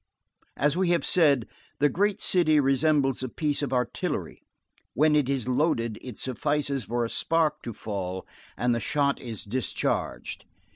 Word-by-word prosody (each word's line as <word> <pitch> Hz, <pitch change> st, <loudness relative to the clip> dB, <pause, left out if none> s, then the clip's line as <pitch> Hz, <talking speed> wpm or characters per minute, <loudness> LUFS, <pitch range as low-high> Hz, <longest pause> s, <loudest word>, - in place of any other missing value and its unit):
As 145 Hz, +1 st, +2 dB
we 185 Hz, -1 st, +1 dB
have 175 Hz, -1 st, +2 dB
said, 145 Hz, -9 st, +3 dB, 0.3 s
the 145 Hz, -, +4 dB
great 205 Hz, +6 st, +1 dB
city 155 Hz, -6 st, +3 dB
resembles 135 Hz, -1 st, +2 dB
a 130 Hz, -, -3 dB
piece 150 Hz, +2 st, -1 dB
of 140 Hz, -3 st, -2 dB
artillery; 125 Hz, -2 st, -2 dB, 0.5 s
when 150 Hz, +3 st, +4 dB
it 145 Hz, -3 st, +2 dB
is 135 Hz, -4 st, -1 dB
loaded, 125 Hz, -5 st, 0 dB
it 125 Hz, -5 st, -8 dB
suffices 140 Hz, 0 st, -1 dB
for 120 Hz, +1 st, -1 dB
a -, -, -1 dB
spark 155 Hz, +3 st, +1 dB
to 120 Hz, -, -5 dB
fall, 95 Hz, -4 st, -5 dB, 0.3 s
and 125 Hz, -1 st, +2 dB
the 115 Hz, -, 0 dB
shot 140 Hz, +2 st, +1 dB
is 115 Hz, -5 st, -6 dB
discharged. 115 Hz, +1 st, -2 dB
140 Hz, 155 wpm, -27 LUFS, 120-150 Hz, 0.5 s, the